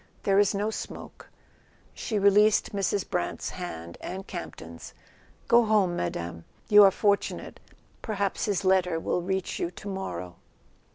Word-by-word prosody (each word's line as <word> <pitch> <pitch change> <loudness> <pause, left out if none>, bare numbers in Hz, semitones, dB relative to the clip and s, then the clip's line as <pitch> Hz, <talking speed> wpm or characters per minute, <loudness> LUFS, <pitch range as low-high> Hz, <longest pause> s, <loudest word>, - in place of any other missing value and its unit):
There 195 0 +3
is 205 -1 +3
no 210 +2 -1
smoke." - - -8 0.6
She 220 - -3
released 205 +2 +4
Mrs. 200 0 -1
Brant's 175 - -2
hand 85 - -7
and 190 +1 -6
Campton's. - - -8 0.5
"Go 235 -1 +5
home, 205 -5 +2
Madame. 85 - -4 0.3
You 210 0 +9
are - - +8
for¬ 200 +1 +3
tunate. - - -7 0.4
Perhaps 200 -3 -2
his 200 -2 -1
letter 180 -3 +3
will 180 - -1
reach 190 +1 -2
you 170 - -1
tomorrow." 175 - -6
195 Hz, 135 wpm, -27 LUFS, 175-205 Hz, 0.6 s, You